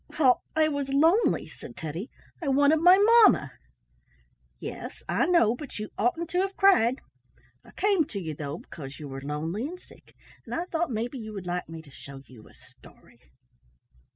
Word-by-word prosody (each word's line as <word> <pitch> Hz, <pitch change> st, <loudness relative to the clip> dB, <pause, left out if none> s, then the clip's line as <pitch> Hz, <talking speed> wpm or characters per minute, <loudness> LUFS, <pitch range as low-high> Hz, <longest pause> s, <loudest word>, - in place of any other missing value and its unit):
"Well, 260 Hz, -5 st, +4 dB
I 315 Hz, 0 st, +4 dB
was 285 Hz, -2 st, -3 dB
lonely," 325 Hz, +11 st, +3 dB
said -, -, -12 dB
Teddy. 165 Hz, -, -6 dB, 0.3 s
"I 320 Hz, -, -4 dB
wanted 285 Hz, +3 st, +4 dB
my 360 Hz, +3 st, +7 dB
mamma." 420 Hz, -, +5 dB, 1.1 s
"Yes, -, -, -8 dB
I -, -, +1 dB
know, 245 Hz, -11 st, +3 dB
but 280 Hz, +1 st, -9 dB
you 215 Hz, 0 st, -5 dB
oughtn't 325 Hz, +10 st, -1 dB
to 360 Hz, -, +1 dB
have 390 Hz, 0 st, -3 dB
cried. 265 Hz, -, +4 dB, 0.6 s
I -, -, -18 dB
came 395 Hz, -6 st, +1 dB
to 215 Hz, -9 st, -6 dB
you, 160 Hz, -4 st, -5 dB
though, 145 Hz, +1 st, -5 dB
because 140 Hz, -5 st, -10 dB
you 150 Hz, -, -7 dB
were 135 Hz, 0 st, -7 dB
lonely 160 Hz, -, -3 dB
and 360 Hz, +3 st, -9 dB
sick, -, -, -20 dB, 0.3 s
and -, -, -6 dB
I 340 Hz, -, -2 dB
thought 340 Hz, -2 st, -2 dB
maybe 240 Hz, +3 st, -3 dB
you 220 Hz, -1 st, -8 dB
would 195 Hz, -3 st, -7 dB
like 180 Hz, -1 st, -4 dB
me 165 Hz, -1 st, -9 dB
to 145 Hz, -, -17 dB
show 135 Hz, 0 st, -12 dB
you 120 Hz, -4 st, -16 dB
a -, -, -20 dB
story." -, -, -20 dB
245 Hz, 180 wpm, -27 LUFS, -, 1.1 s, my